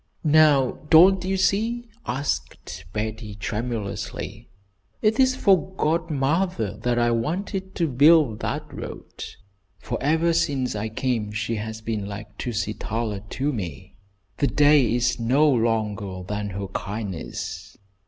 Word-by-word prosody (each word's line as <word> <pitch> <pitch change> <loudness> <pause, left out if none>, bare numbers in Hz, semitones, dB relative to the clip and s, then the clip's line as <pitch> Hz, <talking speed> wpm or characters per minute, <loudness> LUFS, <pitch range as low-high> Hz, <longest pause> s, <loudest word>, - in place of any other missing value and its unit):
"Now, 150 -4 +4
don't 180 +3 +7
you 190 +1 0
see?" 225 +5 +1 0.2
asked 85 - -3
Betty, 110 0 -4
tremulously, 105 -1 -4 0.5
"It 215 +4 +2
is 260 -1 +4
for 190 -5 +2
godmother 155 - 0
that 120 +2 0
I 120 0 +3
wanted 190 - -2
to 170 - +1
build 145 -3 +5
that - - -2
road, - - -8 0.5
for - - -4
ever 160 +4 +2
since 140 -8 0
I 105 +1 -3
came 110 -2 -1
she 110 +2 -2
has 110 +1 -5
been 110 -3 -3
like 105 +1 -8
Tusitala 110 -1 -2
to 145 +3 -1
me. 85 - -6 0.4
'The 140 - +2
day 145 -3 +4
is 120 0 +1
no 130 +7 +3
longer 110 -7 0
than 105 0 -3
her 100 +1 -4
kindness.' 95 -5 -5
120 Hz, 125 wpm, -24 LUFS, 105-155 Hz, 0.5 s, don't